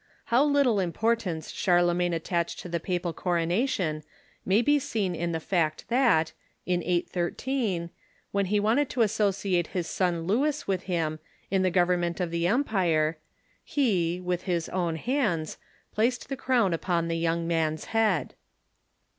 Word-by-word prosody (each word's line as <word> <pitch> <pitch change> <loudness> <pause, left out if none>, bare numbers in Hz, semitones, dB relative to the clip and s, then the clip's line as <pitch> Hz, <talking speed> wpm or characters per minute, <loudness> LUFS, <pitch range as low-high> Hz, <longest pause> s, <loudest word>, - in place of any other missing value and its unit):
How 250 +4 +6
little 280 -7 +3
importance 185 -2 -1
Charlemagne 175 -1 +2
at 165 - -4
tached 170 -1 -1
to - - -8
the 170 -1 -2
papal 175 0 -2
coronation 175 - 0 0.5
may 200 +5 +4
be 290 +2 +4
seen 205 -8 -2
in 170 0 -2
the 165 - -1
fact 160 -2 -1
that, 235 -11 +3 0.3
in 180 -1 0
813, 175 +3 -1 0.4
when 200 -1 0
he 205 +2 +2
wanted 235 +7 +2
to 245 - +2
associate 200 -5 +1
his 175 - 0
son 175 -2 -1
Louis 280 - 0
with 190 -2 -1
him, 160 -4 -1 0.3
in 195 -1 +2
the 185 - +3
government 175 -1 +1
of 175 -2 -1
the 170 0 0
empire, 175 - +1 0.4
he, 180 - +1
with 180 -1 -3
his 170 -2 0
own 175 -3 -1
hands, 195 - -1 0.3
placed 245 +4 0
the 270 - -2
crown 245 -8 +2
upon 170 0 0
the 165 - -1
young 165 0 0
man's 160 -2 0
head. 215 - +2
180 Hz, 150 wpm, -27 LUFS, 170-220 Hz, 0.5 s, How